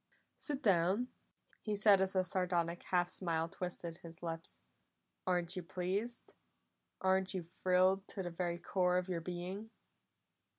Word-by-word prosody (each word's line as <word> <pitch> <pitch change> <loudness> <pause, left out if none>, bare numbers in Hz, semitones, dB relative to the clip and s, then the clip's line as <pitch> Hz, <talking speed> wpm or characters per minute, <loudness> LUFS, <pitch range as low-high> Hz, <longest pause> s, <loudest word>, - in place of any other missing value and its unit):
"Sit 290 -2 -1
down!" 195 +5 +3 0.5
he 210 -1 -1
said 205 -1 +6
as 190 0 +2
a 185 - +4
sardonic 175 -2 0
half 175 -1 +3
smile 165 -3 -1
twisted 170 -1 -4
his 165 0 -11
lips. 165 -1 -5 0.7
"Aren't 180 0 +2
you 185 - -2
pleased? 190 +7 -3 0.7
Aren't 190 0 +2
you 185 - -2
thrilled 185 +2 +2
to 195 - -4
the 175 - -4
very 170 0 -1
core 180 0 +1
of 180 +1 -1
your 170 -2 -1
being?" 180 +5 -5
180 Hz, 140 wpm, -36 LUFS, 175-190 Hz, 0.7 s, said